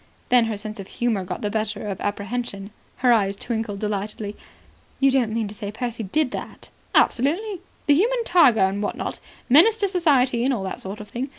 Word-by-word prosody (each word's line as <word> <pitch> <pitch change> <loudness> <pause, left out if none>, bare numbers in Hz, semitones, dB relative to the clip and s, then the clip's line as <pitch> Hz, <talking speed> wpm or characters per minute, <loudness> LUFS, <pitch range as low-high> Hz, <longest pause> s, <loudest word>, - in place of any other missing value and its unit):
Then 245 -2 +5
her 220 -2 -3
sense 210 0 -7
of 195 - -7
humour 235 -6 -1
got 180 - -5
the 205 - -2
better 215 -1 -2
of 195 -2 -4
apprehension. 205 0 -4 0.3
Her 245 - +7
eyes 200 -3 +2
twinkled 220 -1 -3
delightedly. 210 0 -4 0.6
"You 275 0 +4
don't 250 -5 +2
mean 225 -1 -1
to 200 - -8
say 205 -1 -6
Percy 235 +1 -4
did 255 +7 0
that?" - - -8 0.3
"Absolutely. 345 - +2 0.2
The 290 - +5
human 470 +10 +2
tiger, 285 - +5
and 190 +2 +1
what 205 - -2
not. - - -4 0.3
Menace 340 - +6
to 410 -3 +1
Society 275 -10 +2
and 265 +1 +2
all 200 - -4
that 190 - -5
sort 200 +2 -7
of 210 - -11
thing. 255 +4 -4
225 Hz, 200 wpm, -23 LUFS, 205-270 Hz, 0.6 s, Her